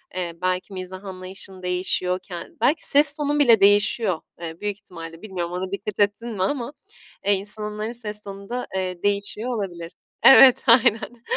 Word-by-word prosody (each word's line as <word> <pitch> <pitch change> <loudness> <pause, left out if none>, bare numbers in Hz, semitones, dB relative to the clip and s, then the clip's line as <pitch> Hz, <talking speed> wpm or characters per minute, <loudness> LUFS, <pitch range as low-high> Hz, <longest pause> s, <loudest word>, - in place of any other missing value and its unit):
eee, 175 -2 -3
belki 185 +2 -2
mizah 185 +1 -7
anlayışın 185 0 -8
değişiyor, 180 0 -1
ken 175 -2 -10
belki 295 +7 +2
ses 290 0 +4
tonun 295 0 0
bile 235 -7 +6
değişiyor, 205 -2 +3 0.2
eee, 165 0 -7
büyük 205 -1 -2
ihtimalle, 165 -4 -11
bilmiyorum 180 -5 -5
ona 185 +1 -4
dikkat 200 +1 -5
ettin 205 +3 +1
mi 200 -5 -2
ama, 255 +5 -2 0.5
eee, 205 - +4
insanların 210 +2 -2
ses 210 -3 -4
tonu 195 0 -9
da, 250 +1 -4
eee, 185 -1 -3
değişiyor 205 +4 -1
olabilir. 175 -5 -5 0.3
Evet, 265 -1 +8
aynen, 230 0 +3
200 Hz, 160 wpm, -23 LUFS, 185-230 Hz, 0.5 s, Evet